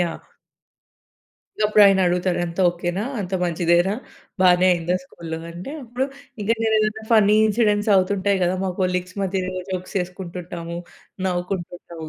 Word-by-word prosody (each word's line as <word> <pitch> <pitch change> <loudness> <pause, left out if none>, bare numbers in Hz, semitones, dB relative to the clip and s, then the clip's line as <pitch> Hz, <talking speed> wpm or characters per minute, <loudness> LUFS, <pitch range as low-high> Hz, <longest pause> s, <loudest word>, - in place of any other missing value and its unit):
Yeah! 170 -2 -1 1.4
ఇగ - - 0
అప్పుడు 210 0 +5
ఆయన 195 -1 +4
అడుగుతాడు 180 0 +1
"అంతా 170 +2 -4
ఓకేనా? 175 +2 -2 0.2
అంత 190 -2 -3
మంచిదేనా? 175 +2 +2 0.5
బానే 180 0 +5
అయిందా 175 0 0
స్కూల్‌లో?" 165 -3 -7
అంటే 175 +9 -8
అప్పుడు 245 +2 -2 0.4
ఇంక 205 - -4
నేను 220 -1 +2
ఏదైనా 215 +1 -1
ఫన్నీ 210 -2 +5
ఇన్సిడెంట్స్ 210 -1 +2
అవుతుంటాయి 195 +1 +2
కదా. 180 +1 +2
మా 190 - 0
కొలీగ్స్ 180 0 -1
మధ్య 190 0 -1 0.3
జోక్స్ 185 +1 -5
వేసుకుంటుంటాము, 175 -2 -6 0.5
నవ్వుకుంటుంటాము. 175 -2 -4
185 Hz, 135 wpm, -22 LUFS, 175-200 Hz, 1.4 s, అప్పుడు